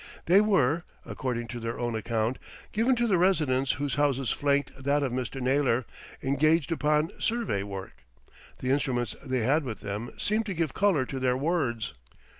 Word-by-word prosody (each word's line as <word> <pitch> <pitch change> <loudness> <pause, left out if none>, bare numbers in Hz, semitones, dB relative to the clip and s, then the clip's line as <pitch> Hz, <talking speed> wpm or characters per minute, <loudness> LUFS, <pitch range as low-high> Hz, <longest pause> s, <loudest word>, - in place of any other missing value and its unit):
They 185 +4 +6
were, 170 -7 +2 0.2
according 120 -3 -3
to 120 - -5
their 115 0 -4
own 120 -1 -1
account, 110 +2 -1 0.3
given 230 +4 +2
to 240 0 +1
the 195 -6 +3
residents 145 -8 +2
whose 145 -1 -2
houses 135 -3 +1
flanked 140 -2 0
that 140 +1 +2
of 135 - -1
Mr. 130 +1 -3
Naylor, 130 -2 +2 0.4
engaged 155 +4 +2
upon 150 0 +1
survey 225 - 0
work. 100 -1 -7 0.5
The 130 - -1
instruments 125 -4 0
they 130 -3 -1
had 145 +8 +2
with 115 -6 -6
them 105 +4 -4
seemed 215 +1 0
to 195 - -3
give 160 -5 -1
colour 190 -10 +2
to 135 +1 -5
their 125 -1 +1
words. 135 -7 -1
135 Hz, 170 wpm, -28 LUFS, 125-160 Hz, 0.5 s, They